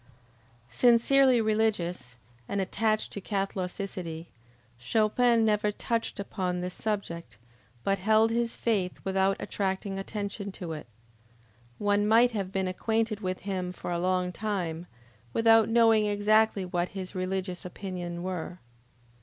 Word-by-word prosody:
Sincerely 250 +1 +5
religious, 210 - 0 0.3
and 200 - -1
attached 215 +3 0
to 200 - -5
Catholicity, 185 -4 -4 0.5
Chopin 225 - +3
never 210 -1 +2
touched 230 +1 -2
upon 185 -3 -2
this 180 0 -4
subject, 190 - -4 0.5
but 195 0 +1
held 220 +3 +4
his 235 0 0
faith 200 -6 -1
without 190 0 +1
attracting 195 0 -2
attention 200 0 -4
to 170 -4 -6
it. 150 -5 -8 0.9
One 205 0 +2
might 235 +3 +5
have 195 -4 -3
been 190 -1 -1
acquainted 220 +3 -1
with 185 -3 -3
him 185 -2 -3
for 180 - -6
a 170 - -1
long 180 0 0
time, 180 -5 -3 0.5
without 225 -1 +5
knowing 225 -2 +4
exactly 210 -1 +3
what 180 0 -1
his 185 0 -5
religious 185 -1 -3
opinion 180 -2 -6
were. 180 -1 -4
195 Hz, 125 wpm, -28 LUFS, 180-220 Hz, 0.9 s, Sincerely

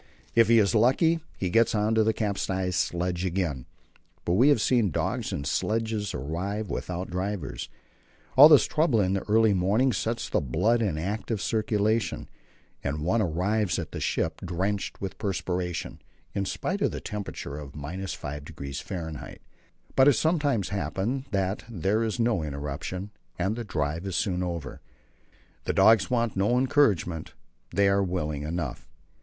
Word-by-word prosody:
If 115 -1 +5
he 115 +1 +6
is 105 -1 +4
lucky 135 +9 +4 0.2
he 90 -2 -2
gets 115 +1 +3
on 105 +1 +1
to 110 -1 +4
the 110 - +3
capsized 95 -4 -1
sledge 90 +1 -1
again, 85 -8 -2 0.6
but 85 - +1
we 125 +10 +5
have 145 - +4
seen 115 -2 +3
dogs 75 - -2
and 70 - -3
sledges 110 +6 -1
arrive 95 +9 -3
without 90 +1 -4
drivers. 90 -4 -3 0.7
All 145 +4 +10
this 150 -3 +7
trouble 150 -7 +2
in 95 -2 +2
the 95 - 0
early 110 0 +5
morning 105 +8 +2
sets 115 +3 -2
the - - 0
blood 90 - +1
in 95 -8 0
active 105 +6 -2
circulation, 110 +1 0 0.6
and 75 +2 -2
one 110 +6 +2
arrives 95 +2 0
at - - -5
the - - -5
ship - - -1
drenched 95 +3 -2
with 95 -2 -6
perspiration, 90 -4 -3 0.3
in 100 - -1
spite 190 - -3
of - - +1
a - - -4
temperature 95 -8 -6
of 70 -2 -9
5°F. 75 -1 -6 0.6
But 130 +1 +6
it 145 - +7
sometimes 145 - +1
happens 100 +6 -2
that 95 -2 -1
there 105 +1 0
is 110 +1 -2
no 115 -6 +2
interruption, 75 +7 -5 0.3
and 95 +5 0
then 120 - -4
the - - -6
drive 80 0 -2
is 95 - -3
soon 90 -4 0
over. 85 -7 -4 0.8
The - - 0
dogs 110 -4 +5
want 120 -3 0
no 105 +6 +2
encouragement; 110 - +1 0.4
they 100 0 +3
are 100 0 +3
willing 75 -6 -2
enough. 80 +3 -4
100 Hz, 155 wpm, -27 LUFS, 85-110 Hz, 0.8 s, All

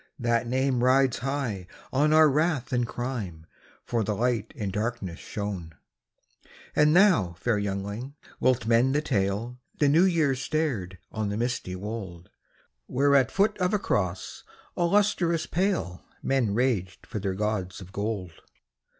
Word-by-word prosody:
" - - -44
That 120 -1 +1
name 130 0 +1
rides 130 0 +3
high 125 -8 -3 0.3
on 145 +3 +3
our 155 0 +7
wrath 150 -2 0
and 120 -1 +1
crime, 110 -11 -5 0.4
For 115 -2 0
the 105 0 -1
Light 115 -1 0
in 105 -5 -3
darkness 105 -4 -3
shone. 95 -6 -5 0.5
" - - -25
And 150 +2 +5
thou, 175 - +5
fair 105 +4 0
youngling, 100 +7 -4 0.2
wilt 125 -3 +2
mend 120 +4 +3
the 150 - +1
tale? 105 +3 -1
" - - -36
The 145 - +4
New 165 +6 +5
Year 165 -7 +3
stared 130 - -2
on 110 -2 -2
the 100 - -2
misty 120 -6 -2
wold, 95 -4 -7 0.6
Where 140 +2 +2
at 135 -4 +5
foot 200 +2 +2
of 180 +3 +2
a - - +4
cross 95 - -2 0.3
all 175 -1 +1
lustrous 190 -5 +2
pale 175 - -1 0.2
Men 125 -7 +1
raged 110 -7 0
for 105 - -5
their 95 -1 -2
gods 100 -2 -2
of 95 -1 -11
gold. 100 -3 -3
120 Hz, 160 wpm, -27 LUFS, 100-140 Hz, 0.6 s, our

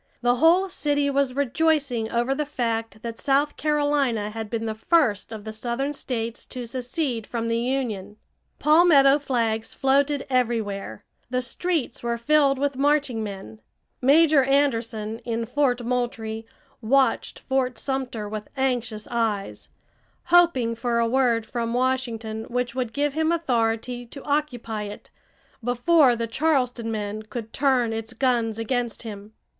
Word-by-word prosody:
The 245 0 +3
whole 340 +7 +5
city 290 -5 0
was 275 -2 +1
rejoicing 280 -4 +1
over 240 +3 +1
the 300 +2 -1
fact 230 -6 -3
that 230 -1 -6
South 280 +2 +1
Carolina 290 -8 +1
had 220 -1 -5
been 225 0 -2
the 220 - -2
first 225 - +1
of 220 -2 -7
the 220 0 -6
southern 240 +6 -2
states 235 -5 -4
to 250 -1 -6
secede 245 0 -3
from 230 -1 -3
the 230 0 0
Union. 230 -6 -2 0.4
Palmetto 300 -3 +6
flags 230 -5 -1
floated 280 +1 +2
everywhere; 220 - -1 0.3
the 250 0 0
streets 300 +1 -2
were 235 0 -1
filled 280 +2 +3
with 280 -1 -1
marching 285 -4 +1
men. 190 - -8 0.4
Major 290 +2 +5
Anderson 230 -5 0
in 230 -1 -3
Fort 250 0 +1
Moultrie 230 -2 -2 0.3
watched 260 +2 +2
Fort 260 -2 -1
Sumter 255 -6 -3
with 210 0 -6
anxious 240 -5 -1
eyes, 220 -4 -2 0.6
hoping 300 -10 +5
for 235 +1 -1
a 230 0 +2
word 235 -2 +2
from 230 +1 -3
Washington 235 -4 -1
which 245 0 -2
would 250 -3 -2
give 290 +1 0
him 320 +2 +1
authority 245 -5 -1
to 275 +3 -10
occupy 255 -7 -2
it 205 0 -10 0.5
before 250 +3 +4
the 230 0 -2
Charleston 250 -3 0
men 210 -1 -3
could 220 +1 -7
turn 260 -5 +2
its 225 +1 -5
guns 235 -3 +1
against 240 +1 -2
him. 210 -1 -9
245 Hz, 140 wpm, -24 LUFS, 225-275 Hz, 0.6 s, Palmetto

